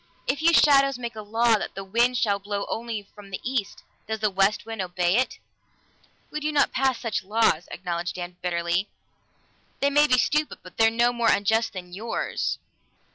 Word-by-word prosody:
If 280 +3 -1
you 335 +1 +5
shadows 275 -4 +5
make 235 -2 -6
a 215 - -6
law 225 +1 +2
that - - -6
the 195 - -5
wind 235 +6 +2
shall 205 -5 +1
blow 200 0 -3
only 225 -2 -3
from 205 -1 -13
the 190 - -5
east, 240 -6 -3 0.2
does 220 0 -3
the 215 -1 +1
west 195 +3 +1
wind 225 -2 -4
obey 180 0 0
it?" 255 - 0 0.9
"We 300 - -3
do 305 0 -1 0.2
pass 265 -1 +1
such 210 -6 -2
laws," 195 -5 +1
acknowledged 175 -1 -4
Dan 175 0 -6
bitterly. 175 +2 -1 0.9
"They 280 0 +2
may 295 +1 +5
be 255 - +4
stupid, 300 +4 +1
but 180 - -14
they're 225 0 +5
no 240 +2 +2
more 235 -1 +2
unjust 220 +3 +2
than 180 -2 -8
yours." 220 +5 -2
220 Hz, 185 wpm, -25 LUFS, 195-245 Hz, 0.9 s, you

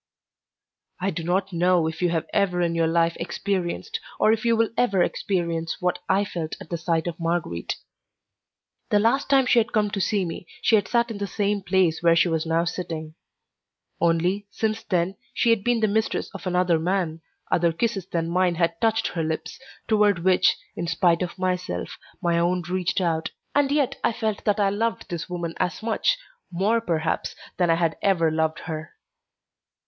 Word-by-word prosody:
I 195 +1 0
do 170 -1 -4
not 185 +3 0
know 175 0 +3
if 160 +1 -4
you 175 - +3
have 165 -2 -1
ever 180 -3 +2
in 170 -1 +1
your 165 -1 +2
life 165 0 +2
experienced, 195 - -2 0.2
or 215 - +5
if 220 - -2
you 230 -1 +3
will 225 0 +2
ever 200 -7 +3
experience, 170 -4 -2
what 180 0 0
I 195 +2 +3
felt 165 -5 -4
at - - -12
the 170 - -1
sight 165 -1 0
of 175 -1 -4
Marguerite. 165 - -2 1.1
The 210 - +4
last 230 +7 +2
time 270 -2 +5
she 245 - +5
had 230 0 0
come 210 -2 +1
to 200 - -2
see 200 -1 +1
me 170 0 -6 0.2
she 225 - +5
had 205 - +2
sat 235 -1 +1
in 205 - -6
the 200 - -2
same 205 0 0
place 180 -4 +2
where 170 -1 +5
she 170 - +4
was 160 0 -1
now 165 +1 +2
sitting; 165 -3 -4 0.9
only, 175 +4 +1
since 220 +1 -2
then, 185 -2 -1 0.2
she 235 - +3
had 225 -4 +2
been 240 0 +1
the 215 - +4
mistress 220 +2 -1
of 195 -1 -7
another 180 -2 +2
man, 170 -2 -1 0.3
other 170 -1 +3
kisses 195 +1 -2
than 165 -2 -1
mine 180 0 +2
had 170 0 0
touched 225 0 +2
her 170 - -3
lips, 160 +3 -3 0.3
toward 210 -5 +3
which, 185 0 +4 0.2
in 170 - -3
spite 165 +1 +2
of 180 0 -3
myself, 180 - -2 0.2
my 170 -1 +2
own 175 +1 +1
reached 180 +2 -1
out, 165 -2 0 0.2
and 285 -1 +2
yet 285 -3 +1
I - - +2
felt 215 -2 -2
that 210 0 +2
I 200 -1 +3
loved 225 +2 -2
this 170 0 -4
woman 170 -2 -3
as 180 +3 -1
much, 230 - +1 0.3
more 205 +6 +1
perhaps, 165 -6 -1 0.2
than 175 -2 +2
I 165 - +5
had 165 -1 +1
ever 170 -5 +3
loved 160 0 0
her. 155 -1 -6
180 Hz, 190 wpm, -24 LUFS, 165-205 Hz, 1.1 s, or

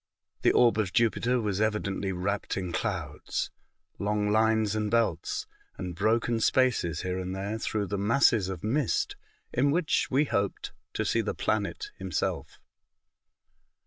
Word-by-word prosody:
The - - +5
orb 120 -3 +4
of 100 -4 -1
Jupiter 120 +2 +2
was 105 -3 -1
evidently 100 -3 0
wrapt 95 +3 -2
in 90 -2 -3
clouds - - -3 0.2
— - - -45
long 105 0 0
lines 110 -1 +3
and 105 -1 0
belts, 115 -8 0 0.3
and 90 -2 -4
broken 115 +5 +1
spaces 110 - +2
here 90 0 -2
and 95 0 -4
there, 100 +3 -3
through 105 -2 -1
the 100 0 -3
masses 105 -2 +3
of 95 -2 -5
mist, 135 +8 0 0.4
in 135 +4 +3
which 160 +2 +1
we 140 +3 +3
hoped 100 -7 -2 0.2
to - - -1
see - - +2
the - - -3
planet 110 - -1
himself. - - -2
105 Hz, 145 wpm, -28 LUFS, 95-115 Hz, 0.4 s, The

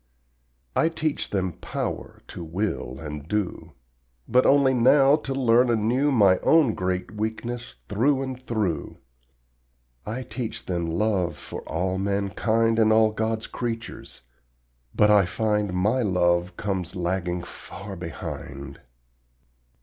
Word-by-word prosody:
I 160 - +3
teach 155 -2 -2
them 95 -2 -1
POWER - - -5
to 85 - -7
will 80 - -3
and 75 -1 -7
do, 90 -5 -3 0.5
But 125 +2 +4
only 140 -1 +5
now 135 +3 +5
to 135 -3 -4
learn 125 -1 +4
anew 120 +6 +2
My 100 -7 +5
own 155 -8 +4
great 90 -1 -2
weakness 115 +3 -4
through 130 +6 +2
and 130 -1 -6
through. 105 - -2 1.1
I 120 +4 -4
teach 120 -2 -5
them 85 -2 -2
LOVE 90 +1 0
for - - -7
all 90 +3 -1
mankind 105 +3 +1
And 110 -1 +5
all 110 0 +5
God's 110 0 -2
creatures, 115 -2 -6 0.7
but 105 0 +5
I 100 -2 +6
find 105 +1 0
My 105 +8 +1
love 90 -3 +1
comes 95 -4 -3
lagging 90 0 -2
far 100 +3 -9
behind. 70 -5 -7
105 Hz, 125 wpm, -25 LUFS, 90-120 Hz, 1.1 s, I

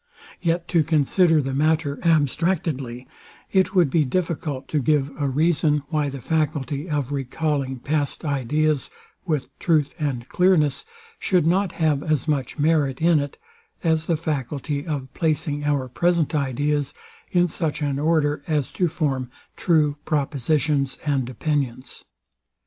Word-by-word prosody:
Yet 170 0 0
to 165 -3 +3
consider 160 +1 +3
the 135 0 -3
matter 150 0 +1
abstractedly, 150 -5 0 0.4
it 190 0 +2
would 170 -7 +4
be 160 0 +3
difficult 150 -2 -2
to 150 - +1
give 145 0 +1
a 140 - +1
reason, 150 0 +2
why 150 -2 0
the 135 -1 -7
faculty 150 0 -1
of 145 -3 -1
recalling 140 0 -1
past 145 +4 -2
ideas 145 +1 0 0.4
with 150 -5 0
truth 155 -5 +2
and 135 -6 -2
clearness, 180 -6 +2 0.3
should 180 - +2
not 185 +2 +2
have 155 -4 +1
as 155 -2 -1
much 140 -3 -1
merit 145 -3 +2
in 165 -1 +4
it, 145 0 -4 0.5
as 160 -1 +1
the 165 - +2
faculty 145 0 -3
of 135 -4 -4
placing 150 -2 -1
our 140 -3 +1
present 170 +4 +1
ideas, 145 0 0 0.3
in 175 -1 +3
such 155 -2 -2
an 140 -1 -1
order, 150 -2 +1
as 150 -4 0
to 180 - +1
form 140 -6 -1 0.3
true 150 -4 +2
propositions 145 -1 0
and 135 -4 0
opinions. 130 -1 -3
150 Hz, 140 wpm, -23 LUFS, 140-160 Hz, 0.5 s, would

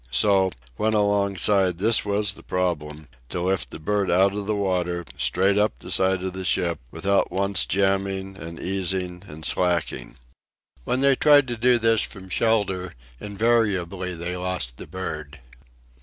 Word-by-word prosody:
So, 95 +8 +3 0.3
when 110 +1 +1
alongside, 100 -2 +2
this 110 +5 +4
was 105 0 0
the - - -13
problem: 75 -5 -3 0.2
to - - -3
lift 95 +1 -1
the - - -8
bird 100 +5 -1
out 95 +2 +4
of 100 -1 -4
the 105 - 0
water, 90 -3 -1
straight 95 +11 +1
up 105 +1 +1
the - - -9
side 95 -1 +2
of 95 -1 -3
the 95 0 -5
ship, 85 -3 +1
without 95 +6 0
once 100 0 0
jamming 95 0 0
and 85 -1 -8
easing 90 -1 -2
and 80 -2 -8
slacking. 85 -9 0 0.7
When 130 - 0
they 140 0 +5
tried 145 -1 +5
to 120 - -2
do 120 +2 +3
this 115 -1 +2
from 95 -3 -7
shelter 95 -5 0 0.2
invariably 100 -4 0
they 85 +2 -4
lost 90 -10 -3
the - - -10
bird. 80 -4 -6
95 Hz, 155 wpm, -24 LUFS, 90-100 Hz, 0.7 s, they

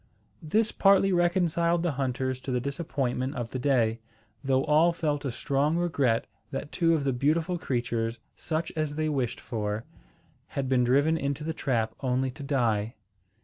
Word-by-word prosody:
This 215 +8 +1
partly 195 -1 +4
reconciled 175 -1 +2
the 175 - +1
hunters 130 -1 -2
to 130 - -4
the 125 - +1
disappointment 135 -1 -2
of 120 -3 -4
the 130 - -3
day, 120 -4 +2 0.4
though 135 0 +2
all 155 +3 +4
felt 150 -3 -1
a 135 - -1
strong 140 +6 0
regret 140 -10 +1 0.2
that 140 +2 -5
two 165 -2 +3
of 150 - -1
the 135 -1 +1
beautiful 160 +7 +1
creatures, 120 -5 -1 0.2
such 160 0 -3
as 155 -2 -1
they 155 0 0
wished 130 -5 -1
for, 110 -1 -3 0.6
had 135 -1 -3
been 130 -1 +3
driven 140 +6 +3
into 140 -1 -2
the 160 +1 -2
trap 115 -7 -1
only 130 0 0
to 130 - -12
die. 120 -5 0
140 Hz, 165 wpm, -28 LUFS, 125-160 Hz, 0.6 s, partly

